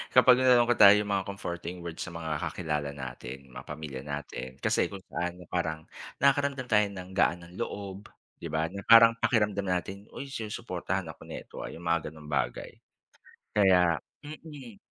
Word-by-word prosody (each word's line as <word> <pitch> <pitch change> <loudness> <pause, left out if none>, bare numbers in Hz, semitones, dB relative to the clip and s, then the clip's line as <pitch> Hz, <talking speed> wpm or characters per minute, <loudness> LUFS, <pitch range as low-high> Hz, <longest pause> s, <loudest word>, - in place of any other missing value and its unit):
Kapag 125 0 +7
nalulungkot 120 -2 +4
tayo 100 0 +10
'yung 105 0 0
mga 95 -1 0
comforting 90 -3 -5
words 85 -1 -7
sa 90 - -4
mga 80 -3 -3
kakilala 75 -4 -2
natin, 65 0 -8
mga - - -10
pamilya 70 -4 -6
natin 70 -3 -6
kasi - - +2
kung 100 -2 -9
paano 90 +1 -3
parang 80 -3 -1 0.4
nakakaramdam 140 -2 +2
tayo 105 -1 +5
ng 95 -2 -8
gaan 90 -2 +2
ng 85 +1 -14
loob, 100 0 -5 0.3
'di - - -5
ba, 80 +1 -1
na 100 - -6
parang 115 0 +9
pakiramdam 105 -4 +1
natin, 95 +3 -3
"Uy 140 0 -7
sinusuportahan 95 -6 -3
ako - - -20
nito - - -9
ah." - - -5
Yung 85 - -9
mga 85 -2 0
ganong 75 -1 -12
bagay. 70 -3 -1 0.9
Kaya 90 -4 +5 0.2
mm. 145 -6 -10
95 Hz, 165 wpm, -29 LUFS, 80-110 Hz, 0.9 s, tayo